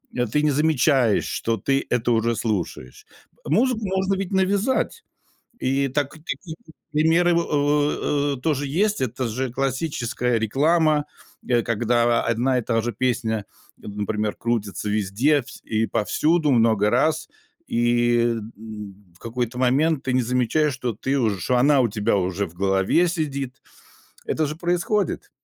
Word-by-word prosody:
э, 125 Hz, -, +1 dB
ты 150 Hz, +7 st, 0 dB
не 150 Hz, -, +3 dB
замечаешь, 140 Hz, -5 st, +2 dB
что 115 Hz, -, -1 dB
ты 135 Hz, +7 st, 0 dB
это 120 Hz, 0 st, +1 dB
уже 115 Hz, 0 st, +1 dB
слушаешь. 95 Hz, -, -4 dB, 0.4 s
Музыку 240 Hz, -, +2 dB
можно 190 Hz, 0 st, 0 dB
ведь 195 Hz, 0 st, -4 dB
навязать. 200 Hz, -, 0 dB, 0.6 s
И 135 Hz, +1 st, +1 dB
так, 140 Hz, +1 st, -1 dB
такие 160 Hz, +1 st, -7 dB, 0.4 s
примеры 165 Hz, +3 st, +3 dB
во, 170 Hz, 0 st, +2 dB
в, 145 Hz, -1 st, 0 dB
э, -, -, -16 dB
тоже 145 Hz, 0 st, 0 dB
есть, 205 Hz, +8 st, +1 dB
это 125 Hz, 0 st, -2 dB
же 130 Hz, +3 st, -3 dB
классическая 125 Hz, -2 st, -1 dB
реклама, 150 Hz, +7 st, +2 dB, 0.4 s
э, 120 Hz, -2 st, +3 dB
когда 120 Hz, +1 st, +1 dB
одна 125 Hz, +3 st, +1 dB
и -, -, -1 dB
та 115 Hz, 0 st, 0 dB
же 120 Hz, +1 st, -2 dB
песня, 110 Hz, -2 st, -1 dB, 0.3 s
например, 105 Hz, +1 st, -3 dB
крутится 105 Hz, -4 st, -2 dB
везде 110 Hz, +9 st, +2 dB
вс -, -, -13 dB
и 110 Hz, 0 st, 0 dB
повсюду 150 Hz, +9 st, +1 dB
много 110 Hz, -3 st, +3 dB
раз, 155 Hz, +7 st, +1 dB, 0.4 s
и, 120 Hz, 0 st, +2 dB, 0.4 s
м, 105 Hz, -2 st, -8 dB, 0.2 s
в -, -, -22 dB
какой-то 120 Hz, +2 st, -4 dB
момент 135 Hz, +4 st, +2 dB
ты 130 Hz, -, -1 dB
не 130 Hz, -, +3 dB
замечаешь, 125 Hz, +5 st, +1 dB
что 125 Hz, -2 st, -3 dB
ты 135 Hz, +6 st, -1 dB
уж 105 Hz, -7 st, 0 dB
что 125 Hz, -, +2 dB
она 140 Hz, +3 st, +4 dB
у 120 Hz, -, +3 dB
тебя 105 Hz, -1 st, 0 dB
уже 95 Hz, +1 st, -1 dB
в 80 Hz, -, -15 dB
голове 95 Hz, -, +2 dB
сидит. 140 Hz, -6 st, -3 dB, 0.7 s
Это 155 Hz, -, 0 dB
же 150 Hz, +2 st, -5 dB
происходит! 175 Hz, +3 st, -1 dB
130 Hz, 150 wpm, -23 LUFS, 115-155 Hz, 0.7 s, она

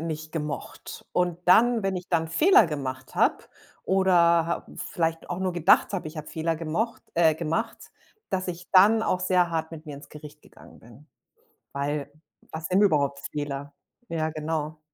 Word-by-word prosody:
nicht 155 Hz, -1 st, -5 dB
gemocht. 150 Hz, -3 st, -6 dB
Und 180 Hz, -2 st, 0 dB
dann 230 Hz, +4 st, +5 dB
wenn 195 Hz, -1 st, -1 dB
ich 180 Hz, 0 st, -7 dB
dann 165 Hz, -2 st, 0 dB
Fehler 300 Hz, -, +5 dB
gemacht 135 Hz, -4 st, -6 dB
habe -, -, +2 dB, 0.4 s
oder 190 Hz, 0 st, +2 dB
ha 170 Hz, -1 st, +3 dB
vielleicht 165 Hz, -1 st, -3 dB
auch 175 Hz, -, -3 dB
nur 185 Hz, -1 st, -1 dB
gedacht 175 Hz, +4 st, +4 dB
habe, 190 Hz, -5 st, -3 dB
ich 155 Hz, +1 st, -9 dB
habe 155 Hz, -1 st, -7 dB
Fehler 165 Hz, +1 st, -2 dB
gemocht 170 Hz, +9 st, -3 dB
äh, 165 Hz, -2 st, +4 dB
gemacht, 165 Hz, 0 st, -3 dB, 0.4 s
dass 185 Hz, -1 st, -1 dB
ich 180 Hz, 0 st, -7 dB
dann 210 Hz, +4 st, +6 dB
auch 185 Hz, -, 0 dB
sehr 180 Hz, -1 st, +2 dB
hart 160 Hz, 0 st, -3 dB
mit 160 Hz, -1 st, -9 dB
mir 150 Hz, -3 st, -8 dB
ins 140 Hz, -, -13 dB
Gericht 150 Hz, 0 st, -12 dB
gegangen -, -, -17 dB
bin. 120 Hz, +6 st, -17 dB, 0.7 s
Weil, 145 Hz, +1 st, -3 dB, 0.4 s
was 160 Hz, 0 st, -5 dB
sind 185 Hz, +2 st, +2 dB
überhaupt 140 Hz, -8 st, +2 dB
Fehler? 145 Hz, -1 st, -5 dB, 0.3 s
Ja, 160 Hz, -4 st, -2 dB
genau. 155 Hz, 0 st, -4 dB
165 Hz, 170 wpm, -26 LUFS, 150-180 Hz, 0.7 s, dann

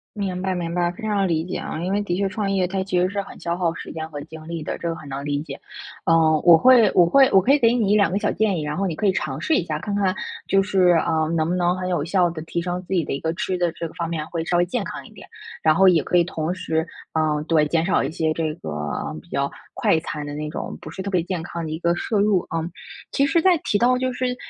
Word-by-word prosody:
明 190 Hz, -3 st, -3 dB
白 190 Hz, -, 0 dB
明 170 Hz, -1 st, -3 dB
白， 175 Hz, -1 st, +1 dB
非 220 Hz, +5 st, -10 dB
常 200 Hz, -3 st, +1 dB
理 160 Hz, -1 st, 0 dB
解 185 Hz, -, -4 dB
啊。 155 Hz, -, -5 dB
因 190 Hz, -, -1 dB
为 205 Hz, -, +1 dB
的 175 Hz, -3 st, -2 dB
确 195 Hz, 0 st, 0 dB
创 200 Hz, 0 st, -2 dB
业 190 Hz, -2 st, +1 dB
它 190 Hz, +1 st, -2 dB
其 190 Hz, -2 st, -1 dB
实 180 Hz, -, +3 dB
是 200 Hz, +1 st, -2 dB
很 -, -, -12 dB
消 170 Hz, 0 st, -2 dB
耗 170 Hz, -2 st, 0 dB
时 -, -, -8 dB
间 160 Hz, -1 st, -5 dB
和 145 Hz, -, -6 dB
精 160 Hz, +1 st, -11 dB
力 165 Hz, -2 st, -4 dB
的， -, -, -3 dB
这 170 Hz, -, -3 dB
个 165 Hz, -, -1 dB
很 155 Hz, -2 st, -11 dB
能 140 Hz, +1 st, -5 dB
理 145 Hz, 0 st, -1 dB
解。 -, -, -8 dB, 0.5 s
呃， 160 Hz, -2 st, +4 dB
我 170 Hz, -2 st, +9 dB
会 250 Hz, +1 st, +6 dB
我 175 Hz, -, +6 dB
会 270 Hz, +7 st, +5 dB
我 195 Hz, -, +6 dB
可 245 Hz, +9 st, +3 dB
以 290 Hz, -, +5 dB
给 230 Hz, -3 st, +4 dB
你 225 Hz, -5 st, +1 dB
1-2 205 Hz, -3 st, +4 dB
个 195 Hz, -, 0 dB
小 210 Hz, -, 0 dB
建 210 Hz, -4 st, +1 dB
议， 155 Hz, -, -2 dB
然 150 Hz, 0 st, -3 dB
后 195 Hz, -, -1 dB
你 165 Hz, -, -3 dB
可 210 Hz, -, 0 dB
以 190 Hz, -, +4 dB
尝 145 Hz, -7 st, -3 dB
试 320 Hz, -, +1 dB
一 -, -, +2 dB
下， 155 Hz, -3 st, -3 dB
看 200 Hz, +5 st, -4 dB
看 195 Hz, -2 st, +1 dB, 0.3 s
就 195 Hz, -, +4 dB
是， 190 Hz, -2 st, +2 dB, 0.2 s
呃， 160 Hz, -1 st, +1 dB
能 160 Hz, 0 st, +1 dB
不 180 Hz, -, 0 dB
能 175 Hz, 0 st, +1 dB
很 185 Hz, 0 st, -3 dB
有 175 Hz, -5 st, 0 dB
效 180 Hz, 0 st, +2 dB
地 160 Hz, -2 st, -6 dB
提 170 Hz, +1 st, -3 dB
升 180 Hz, +1 st, -3 dB
自 190 Hz, -, -4 dB
己 170 Hz, -4 st, +2 dB
的 -, -, -4 dB
一 140 Hz, -, -3 dB
个 160 Hz, -, -1 dB
吃 185 Hz, +2 st, -2 dB
的 175 Hz, -1 st, +1 dB
这 170 Hz, 0 st, -5 dB
个 -, -, -11 dB
方 170 Hz, -1 st, -3 dB
面， 160 Hz, -2 st, -3 dB
会 165 Hz, -2 st, -3 dB
稍 175 Hz, +1 st, 0 dB
微 175 Hz, -, +4 dB
健 230 Hz, +5 st, -2 dB
康 -, -, -7 dB
一 -, -, -15 dB
点， -, -, -13 dB, 0.3 s
然 155 Hz, -, +5 dB
后 195 Hz, +3 st, +5 dB
也 170 Hz, -4 st, +4 dB
可 180 Hz, -, 0 dB
以 170 Hz, -, +5 dB
同 160 Hz, -1 st, -3 dB
时， 160 Hz, -3 st, -1 dB, 0.3 s
呃， 155 Hz, -1 st, +1 dB
对， 160 Hz, -2 st, +3 dB
减 165 Hz, +2 st, +1 dB
少 -, -, +2 dB
一 -, -, -2 dB
些 160 Hz, -1 st, 0 dB
这 155 Hz, -1 st, -2 dB
个 80 Hz, -, -7 dB, 0.5 s
比 175 Hz, -, -23 dB
较 140 Hz, -2 st, -1 dB, 0.3 s
快 160 Hz, -, +2 dB
餐 150 Hz, -2 st, -5 dB
的 145 Hz, -, -6 dB
那 150 Hz, 0 st, -4 dB
种， 165 Hz, -, -5 dB
不 155 Hz, -, -9 dB
是 175 Hz, -, -8 dB
特 200 Hz, -, -4 dB
别 180 Hz, -3 st, +1 dB
健 180 Hz, 0 st, -3 dB
康 170 Hz, -1 st, -5 dB
的 155 Hz, -, -5 dB
一 155 Hz, -, -3 dB
个 170 Hz, 0 st, +1 dB
摄 210 Hz, +4 st, -1 dB
入， 205 Hz, -2 st, +3 dB
啊。 165 Hz, -, -1 dB, 0.5 s
其 275 Hz, -, +2 dB
实 335 Hz, -, +3 dB
在 360 Hz, 0 st, +4 dB
提 205 Hz, -8 st, 0 dB
到 250 Hz, +1 st, +3 dB
就 255 Hz, 0 st, -1 dB
是， 250 Hz, 0 st, -2 dB
175 Hz, 320 characters per minute, -22 LUFS, 160-195 Hz, 0.5 s, 我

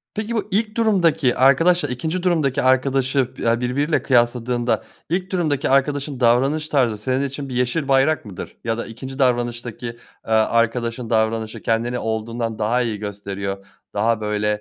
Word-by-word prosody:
Peki 220 Hz, +2 st, -3 dB
bu 215 Hz, -, -1 dB
ilk 215 Hz, +3 st, 0 dB
durumdaki 170 Hz, -, +3 dB
arkadaşla 145 Hz, +5 st, +4 dB
ikinci 160 Hz, +9 st, -3 dB
durumdaki 155 Hz, -7 st, +1 dB
arkadaşı 130 Hz, 0 st, +2 dB
ya 115 Hz, 0 st, +1 dB
birbiriyle 140 Hz, +6 st, 0 dB
kıyasladığında, 120 Hz, -2 st, +1 dB, 0.3 s
ilk 185 Hz, +3 st, -2 dB
durumdaki 160 Hz, -7 st, 0 dB
arkadaşın 140 Hz, 0 st, +1 dB
davranış 135 Hz, +6 st, +2 dB
tarzı 120 Hz, -7 st, +2 dB
senin 130 Hz, +5 st, -1 dB
için 140 Hz, 0 st, -7 dB
bir 125 Hz, -, -5 dB
yeşil 125 Hz, +4 st, 0 dB
bayrak 135 Hz, +2 st, +3 dB
mıdır? 100 Hz, -4 st, -8 dB
Ya 115 Hz, -1 st, -1 dB
da 115 Hz, -, -4 dB
ikinci 130 Hz, +4 st, -8 dB
davranıştaki, 120 Hz, -2 st, -1 dB
eee, 115 Hz, 0 st, -7 dB, 0.4 s
arkadaşın 115 Hz, +1 st, +1 dB
davranışı 110 Hz, -1 st, 0 dB
kendini 120 Hz, +2 st, 0 dB
olduğundan 110 Hz, 0 st, -3 dB
daha 115 Hz, +4 st, +1 dB
iyi 115 Hz, -4 st, -2 dB
gösteriyor. 100 Hz, -1 st, -5 dB, 0.3 s
Daha 110 Hz, +2 st, +1 dB
böyle, 105 Hz, 0 st, -1 dB
125 Hz, 150 wpm, -21 LUFS, 115-145 Hz, 0.4 s, arkadaşla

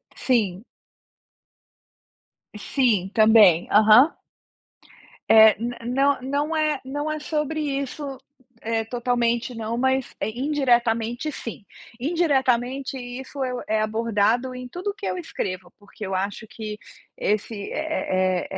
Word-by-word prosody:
Sim. 215 Hz, -5 st, 0 dB, 1.9 s
Sim, 210 Hz, -4 st, +1 dB
também. 215 Hz, -6 st, +6 dB
Aham. 220 Hz, +8 st, +6 dB, 1.1 s
Eh, 220 Hz, -1 st, +8 dB, 0.3 s
não 270 Hz, +2 st, +1 dB
não 290 Hz, +4 st, -1 dB
é 305 Hz, -2 st, +1 dB
não 290 Hz, +3 st, -3 dB
é 310 Hz, -, -3 dB
sobre 300 Hz, 0 st, -2 dB
isso, 280 Hz, -1 st, -4 dB, 0.4 s
eh, 225 Hz, 0 st, -1 dB
totalmente, 240 Hz, 0 st, -1 dB
não, 225 Hz, 0 st, -3 dB
mas, 265 Hz, +1 st, 0 dB
eh, 200 Hz, -, -1 dB
indiretamente, 240 Hz, 0 st, 0 dB
sim. 230 Hz, -6 st, -8 dB, 0.3 s
Indiretamente, 265 Hz, -4 st, 0 dB
isso 260 Hz, +2 st, -6 dB
é 255 Hz, -, -2 dB
o 245 Hz, -, -5 dB
é 215 Hz, 0 st, +1 dB
abordado 225 Hz, +3 st, 0 dB
em 250 Hz, 0 st, -7 dB
tudo 370 Hz, +8 st, -4 dB
que 405 Hz, -1 st, -8 dB
eu -, -, -2 dB
escrevo, 185 Hz, -, -5 dB
porque 205 Hz, +1 st, -10 dB
eu 190 Hz, -, -4 dB
acho 200 Hz, +4 st, -3 dB
que 215 Hz, -1 st, -7 dB, 0.4 s
esse 210 Hz, 0 st, -2 dB
é 185 Hz, -, -1 dB
é -, -, -8 dB
245 Hz, 120 wpm, -23 LUFS, 220-275 Hz, 1.9 s, Eh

